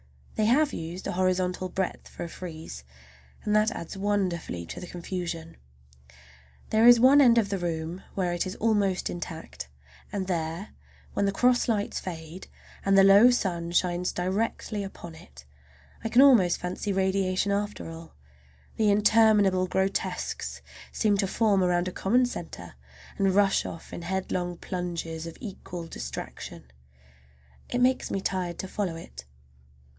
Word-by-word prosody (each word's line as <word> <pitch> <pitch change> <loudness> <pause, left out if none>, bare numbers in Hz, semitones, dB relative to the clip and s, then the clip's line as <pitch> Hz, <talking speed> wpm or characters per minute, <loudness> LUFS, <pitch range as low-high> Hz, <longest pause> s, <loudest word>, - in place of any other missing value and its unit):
They 215 - +1
have 285 +5 +3
used 170 +3 -6
a - - -2
horizontal 185 0 0
breadth 190 0 -3
for - - -8
a - - -4
frieze, 160 - -8 0.6
and 210 - +1
that 215 +1 +4
adds 170 -7 -7
wonderfully 190 - -1
to - - -7
the 180 - -8
confusion. 170 -2 -5 1.1
There 220 +2 +5
is 240 -1 +9
one 270 +4 +7
end 240 -3 +6
of 215 -4 +2
the 195 -1 -2
room 170 +1 -3
where 180 -3 0
it 175 +2 -1
is 185 - -5
almost 205 -5 +1
intact, 160 - -7 0.4
and 195 -2 -2
there, 170 +1 -3 0.4
when 200 - +1
the 200 - +2
cross 245 +4 +3
lights 210 -3 0
fade 165 0 -8 0.4
and 195 0 +3
the 195 - +8
low 200 +5 +8
sun 175 -8 -1
shines 175 0 +1
directly 200 +3 -2
upon 175 -3 -9
it, 70 - -15 0.6
I 225 - -2
can 250 +4 +6
almost 220 -11 +6
fancy 180 +3 -3
radiation 190 0 +1
after 205 -4 -2
all,—the 70 - -6
interminable 205 -3 +4
grotesques 190 +2 -2 0.3
seem 210 -2 +2
to 195 - +2
form 200 -2 +2
around 175 0 +1
a - - -2
common 245 +8 +2
centre 245 - -7 0.5
and 195 -1 +2
rush 200 -1 +3
off 165 - -9
in - - -6
headlong 180 -1 -2
plunges 170 -3 -4
of 165 - -9
equal 180 -5 -7
distraction. 65 - -8 1.0
It 245 - -1
makes 255 +1 +2
me 195 - -1
tired 185 -3 -2
to 190 - -4
follow 185 -3 -3
it. 65 - -10
185 Hz, 150 wpm, -27 LUFS, 170-205 Hz, 1.1 s, is